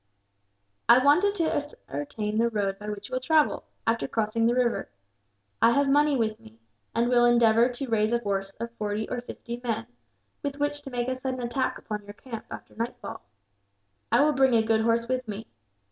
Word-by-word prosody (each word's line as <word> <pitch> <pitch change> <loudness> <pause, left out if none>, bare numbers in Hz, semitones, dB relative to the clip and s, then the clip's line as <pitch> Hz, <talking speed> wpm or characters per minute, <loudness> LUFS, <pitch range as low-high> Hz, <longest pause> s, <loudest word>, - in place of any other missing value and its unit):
"I 235 - +9
wanted 300 +10 +4
to 330 -5 0
ascertain 210 - -4
the 235 +1 +3
road 200 -3 -1
by 210 0 -6
which 205 -1 -6
you - - -11
will 255 - +1
travel, 305 +3 +2 0.2
after 230 0 +1
crossing 225 +1 +1
the 240 - +2
river. 245 -2 0 0.7
I - - +7
have 280 +1 +3
money 290 0 +4
with 220 -2 -1
me, 110 +1 -16 0.4
and 235 +1 +2
will 245 -1 +4
endeavour 235 0 +5
to 255 +2 -5
raise 220 -1 +1
a 235 - +2
force 195 -3 -2
of 235 0 -4
forty 210 +1 -2
or 245 - -3
fifty 240 0 -7
men; 225 -2 -2 0.6
with 285 -1 -3
which 290 0 -1
to 285 - -8
make 245 -1 -2
a 260 - 0
sudden 255 0 -4
attack 240 +2 -1
upon 210 -1 -5
your 205 0 -10
camp, 225 +1 -8
after - - -9
nightfall. 240 +2 -5 0.9
I - - +5
will 300 0 +3
bring 265 -2 +4
a 225 - +4
good 220 0 +2
horse 230 +1 +1
with 255 -1 -2
me. 210 +1 -5
235 Hz, 195 wpm, -27 LUFS, 220-260 Hz, 0.9 s, I